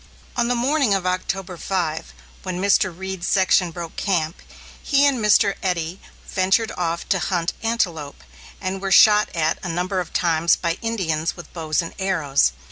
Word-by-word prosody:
On 240 -1 +1
the 245 - +1
morning 255 -2 +2
of 190 -2 -2
October 185 0 -2
5, 165 -4 -2 0.3
when 185 -1 -4
Mr. 190 -1 +3
Reed's 190 +1 -5
section 185 -2 +3
broke 170 0 -8
camp, 170 -4 -1 0.4
he 280 -1 +3
and 275 -3 +2
Mr. 210 -1 +4
Eddy 180 -1 -2 0.2
ventured 195 +4 +1
off 170 -1 -2
to 190 - +2
hunt 175 0 -1
antelope, 175 -11 -2 0.4
and 190 0 -4
were 195 -1 -3
shot 210 +2 +6
at 160 -1 0
a 180 - -5
number 180 +3 -1
of 180 - -5
times 170 -1 +2
by 170 0 -2
Indians 170 -9 -2
with 175 -3 -12
bows 160 -1 -1
and 165 - -8
arrows. 155 - +1
185 Hz, 165 wpm, -22 LUFS, 165-200 Hz, 0.4 s, shot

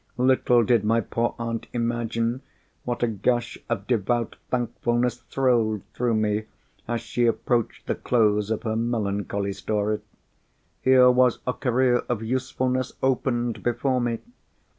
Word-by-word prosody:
Little 125 -1 +4
did 115 -1 +3
my 115 +2 +3
poor 115 +2 -1
aunt 115 -1 -4
imagine 120 0 -1 0.4
what 120 0 -2
a - - +4
gush 115 +3 -1
of 105 -4 -2
devout 120 0 0
thankfulness 120 0 0
thrilled 115 -6 +1
through 120 -2 0
me 105 0 0 0.4
as 120 0 -1
she 120 -1 0
approached 115 0 0
the - - 0
close 105 -3 +1
of 110 +1 -2
her 110 -2 -1
melancholy 100 -3 -1
story. 105 +2 -1 0.8
Here 130 -1 +6
was 125 -1 +4
a 125 - 0
career 125 -1 +2
of 115 -2 -1
usefulness 130 +1 -1
opened 120 -3 0
before 125 +2 0
me! 120 -1 0
120 Hz, 135 wpm, -25 LUFS, 110-125 Hz, 0.8 s, Here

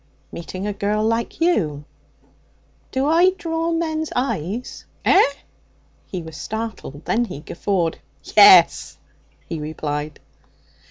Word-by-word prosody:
'Meeting 185 +3 -6
a 210 - -2
girl 210 +2 -1
like 230 +1 -1
you.' 160 - 0 1.1
'Do 265 +1 0
I 335 +5 +5
draw 330 0 -2
men's 315 -1 -2
eyes?' 240 - -3 0.2
'Eh?' - - +6 0.9
He 180 -3 -5
was 160 -1 -10
startled. 220 -10 -6
Then 240 +2 +1
he 145 - -8
guffawed. 170 0 -2 0.4
'Yes,' 400 -2 +7 0.5
he 165 - -4
replied. 150 -1 -4
215 Hz, 110 wpm, -21 LUFS, -, 1.1 s, Yes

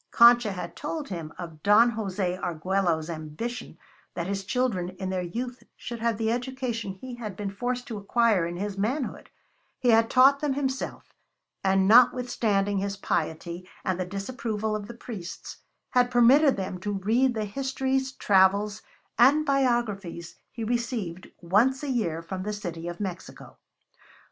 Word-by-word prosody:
Concha 235 -3 +6
had 180 -2 -6
told 300 -1 -4
him 165 -5 -5
of 165 -3 -8
Don 215 +5 +6
Jose 195 -4 -2
Arguello's 175 -2 -1
ambition 165 +9 -6 0.4
that 170 - -2
his 195 +1 -3
children 205 -5 -1
in 190 -1 -3
their 185 -1 -1
youth 245 +8 -5
should 235 -1 -7
have 230 -1 0
the 225 0 0
education 245 -4 -3
he 250 +6 -9
had 220 -5 -6
been 200 0 -4
forced 245 +4 -3
to 220 -3 -5
acquire 205 -4 +2
in 175 0 -5
his 200 +1 -4
manhood; 250 +6 -2 0.5
he 250 - +1
had 225 0 +5
taught 270 +2 +6
them 290 -2 0
himself, 265 -1 -3 0.5
and 190 0 +3
notwithstanding 220 -4 +4
his 200 +1 -3
piety 170 0 -3 0.2
and 185 -1 0
the 185 - -1
disapproval 215 +2 -3
of 205 -1 -5
the 235 - -9
priests, 205 -7 -8 0.3
had 245 -1 +3
permitted 260 +4 +5
them 185 -1 -4
to 205 +3 -3
read 235 +6 +2
the 215 -1 -1
histories, 265 +3 -1
travels, 200 0 +3 0.4
and 285 +6 +6
biographies 235 - 0 0.2
he 230 - -6
received 225 -6 -2
once 230 - +2
a 285 - -1
year 170 -10 -1
from 185 +2 -5
the 210 +2 -3
City 175 -5 -5
of 175 0 -6
Mexico. 185 -3 -7
210 Hz, 155 wpm, -27 LUFS, 185-245 Hz, 0.5 s, Concha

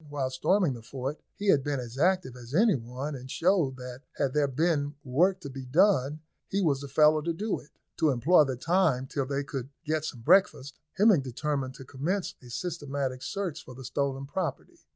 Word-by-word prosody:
While 140 -3 -2
storming 170 +4 +2
the 120 - -8
fort, 130 +5 -5
he 205 0 -2
had 140 -7 +5
been 145 -1 -1
as 120 -1 -7
active 175 -3 +1
as 125 +2 -8
any 215 +4 +5
one, 130 +3 -4
and 130 -1 -8
showed 165 -5 +2
that 125 0 -8
had 135 -2 0
there 150 -1 +3
been 145 +1 0
work 175 +9 +2
to 140 - -7
be 135 0 -7
done 150 0 +3 0.3
he 195 - -1
was 150 -8 +2
the 140 - -6
fellow 150 +2 +4
to 170 +3 -1
do 205 +6 -2
it. 150 - -17 0.3
To 160 -2 +3
employ 145 +6 +5
the 130 -2 -2
time 165 -2 +2
till 135 0 -3
they 140 +1 -1
could 135 -2 -5 0.2
get 155 0 0
some 125 -6 -5
breakfast, 145 - +3
Hemming 200 -5 +5
determined 135 +1 -3
to 135 - -10
commence 165 +10 -2
a 125 - -13
systematic 140 -3 -3
search 190 +2 -4
for 130 - -11
the 130 0 -9
stolen 135 +1 -2
property. 160 0 -4
140 Hz, 200 wpm, -28 LUFS, 130-170 Hz, 0.3 s, had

